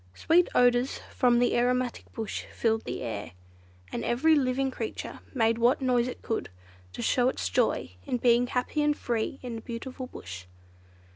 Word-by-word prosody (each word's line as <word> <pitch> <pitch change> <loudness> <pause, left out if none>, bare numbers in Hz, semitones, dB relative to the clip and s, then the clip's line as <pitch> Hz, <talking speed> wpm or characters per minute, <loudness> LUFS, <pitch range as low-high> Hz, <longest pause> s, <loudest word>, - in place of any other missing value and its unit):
Sweet 340 +2 +3
odours 245 +1 +3
from 245 -2 +3
the 245 0 +3
aromatic 250 0 0
bush 220 -2 -4
filled 225 -1 0
the - - -4
air, 100 -7 -5 0.6
and - - -3
every 290 +7 +3
living 265 -2 +1
creature - - -5
made 230 -3 +2
what 240 +3 +4
noise 250 -2 +2
it 250 - -7
could, 225 - -2 0.4
to - - -5
show 250 0 +3
its 90 - -2
joy 90 -1 +1 0.2
in 250 - 0
being 240 0 +4
happy 250 +5 -1
and 295 0 +2
free 235 +2 -2
in 245 -2 -5
the - - -7
beautiful 255 +3 -6
Bush. 90 - -9
245 Hz, 165 wpm, -28 LUFS, 230-255 Hz, 0.6 s, what